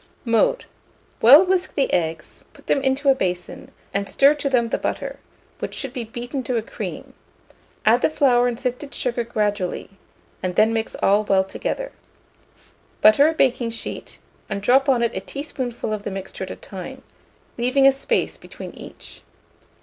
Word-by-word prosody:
Mode. 230 - +2 0.6
Well 285 +10 +9
whisk 370 0 0
the 275 - 0
eggs; 165 -2 -2
put - - -19
them 275 - +1
into 270 +1 +1
a - - +7
basin, 180 -7 -4 0.2
and 200 0 -2
stir 280 +2 +5
to 290 -2 -2
them 240 -3 +2
the - - -1
butter, - - -4 0.4
which - - -5
should 270 -3 -5
be 250 -3 -4
beaten 245 +4 -5
to 250 0 0
a 225 - -1
cream; - - -7 0.7
add 230 +3 +5
the - - +3
flour 250 -5 +3
and 240 -1 -3
sifted 255 +3 -4
sugar 240 -1 -1
gradually, 205 -5 -2 0.5
and 180 -1 -3
then 220 +1 +4
mix 225 -1 -2
all 205 +2 +4
well 195 -2 +3
together. - - -4 1.1
Butter 215 +8 +7
a - - -1
baking 250 -5 +1
sheet, 230 - -7 0.3
and 200 -1 -2
drop 265 +5 +4
on 245 -3 +3
it 235 - 0
a - - -1
teaspoonful 255 -2 -5
of 210 - -3
the 205 - -4
mixture 190 0 -6
at - - -12
a - - -6
time, 260 +8 -9 0.6
leaving 255 +3 +3
a 275 - +8
space 270 0 -1
between - - -10
each. - - -12
240 Hz, 170 wpm, -22 LUFS, 210-270 Hz, 1.1 s, Well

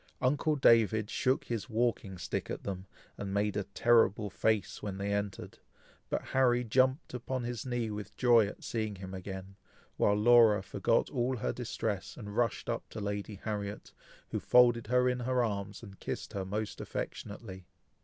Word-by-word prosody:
Uncle 145 +4 +2
David 110 -5 +4
shook 130 0 +1
his 115 +1 -4
walking 110 -4 0
stick - - -3
at - - -5
them, 95 -1 -5 0.3
and 100 -1 -4
made 105 0 +1
a 100 - -1
terrible 110 -1 +3
face, 110 +1 0
when 100 -2 -4
they 100 +1 -1
entered; 100 -1 -4 0.5
but - - -1
Harry 125 -2 +3
jumped 130 +6 +2
upon 125 +1 -3
his 120 0 -4
knee 120 -3 -1
with 105 -1 -7
joy 120 -4 +5
at 105 - -9
seeing 110 -3 -2
him 95 0 -8
again, 95 +1 -7 0.4
while 100 - +3
Laura 110 -2 +6
forgot - - +1
all 125 +2 0
her 110 - -1
distress, 110 -5 -3
and 105 -3 -7
rushed 120 -1 0
up - - -3
to - - -7
Lady 100 0 -3
Harriet, 105 -2 -4 0.4
who - - -2
folded 120 -2 +5
her 125 +1 +3
in 125 0 +1
her 125 0 +1
arms, 100 -1 -3
and 100 -3 -11
kissed - - -5
her 95 -1 -3
most 105 +2 -3
affectionately. 95 -3 -6
110 Hz, 170 wpm, -31 LUFS, 100-120 Hz, 0.5 s, Laura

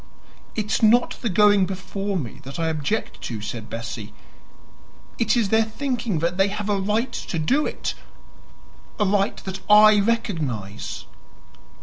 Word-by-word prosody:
"It 215 - -1
is - - +1
not 235 +2 +4
the 235 - -1
going 205 0 +4
before 195 +1 -3
me 135 -5 -5
that 135 +2 -8
I 165 -1 0
object 160 +7 -2
to," 115 -3 -5
said 105 +2 -6
Bessie; 115 -2 -6 1.1
"it 225 +1 +2
is 220 -4 +1
their 225 +1 +4
thinking 230 - -2
that 170 +3 -1
they 195 +1 +4
have 210 +1 -4
a 200 -1 +1
right 220 +6 0
to 175 - -4
do 260 - +1
it - - -3 1.1
A 210 - +3
RIGHT 200 +1 0
THAT 190 0 -4
I 210 0 +8
RECOGNIZE." 155 - -2
195 Hz, 150 wpm, -23 LUFS, 155-215 Hz, 1.1 s, I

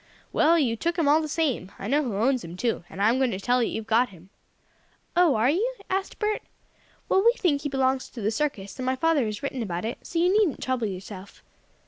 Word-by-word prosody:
"Well, 335 +2 +4
you 250 -8 +1
took 335 +8 -2
him 325 -4 +2
all 300 +2 +5
the 310 - -3
same. 290 - -1
I 195 - -6
know 285 +6 +2
who 240 -8 -3
owns 250 +5 +1
him, 170 +2 -8
too; 230 -4 -1
and - - -10
I'm 225 +5 +3
going 265 -2 +2
to 190 - -3
tell 245 +5 +2
that 235 - +2
you've 220 - -4
got 230 +3 +3
him." 185 0 -17 0.8
"Oh, 350 -4 +5
are 225 +5 +3
you?" 460 +10 0 0.2
asked 385 +1 -2
Bert. 425 0 -1 0.7
"Well, 385 - +3
we 470 +1 +6
think 325 - 0
he 290 - -3
belongs 265 -1 0
to 245 - -10
the 210 +2 0
circus, 220 -7 -3
and 255 - -3
my 260 - +2
father 295 -3 +2
has 210 +2 -5
written 270 -2 -3
about 180 -3 -3
it, 230 - -4
so 335 - -6
you 355 +4 +3
needn't 415 -9 +2
trouble 255 -4 -1
yourself." 190 0 -9
260 Hz, 240 wpm, -26 LUFS, 215-320 Hz, 0.8 s, we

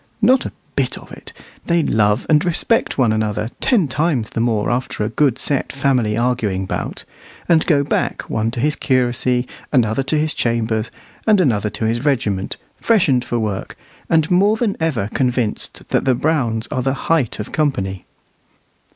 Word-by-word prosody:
Not 250 +4 +3
a - - -8 0.2
bit - - 0
of - - -13
it. - - -11 0.4
They 170 -1 +2
love 105 -2 +2
and 150 -1 +4
respect 180 +6 +1
one 125 -5 +3
another 110 0 -1
ten 215 - +2
times 140 -5 0
the - - -3
more 115 -2 +1
after 120 -3 -2
a 105 - -1
good 130 +1 +1
set 140 0 -1
family 130 -6 +1
arguing 115 -6 0
bout, - - -4 0.4
and 165 -2 +4
go 145 -4 +3
back, 140 - -1
one 110 0 -1
to 120 +1 -5
his 150 +4 +1
curacy, 125 -1 +1 0.2
another 120 -2 +2
to 140 +3 0
his 155 +1 +1
chambers, 115 -1 -1 0.4
and 210 -2 +5
another 110 - +2
to 110 - -4
his 115 +3 0
regiment, 105 -9 0 0.2
freshened 160 - +3
for 120 - -2
work, 105 -4 -3 0.3
and 160 0 +2
more 200 +4 +4
than 220 -3 0
ever 150 -11 0
convinced 125 -4 -2
that - - +1
the 130 -2 +3
Browns 120 -6 0
are 130 - -1
the 135 +1 0 0.2
height 145 -11 +1
of 105 - -5
company. 95 - -1
125 Hz, 170 wpm, -19 LUFS, 110-155 Hz, 0.4 s, and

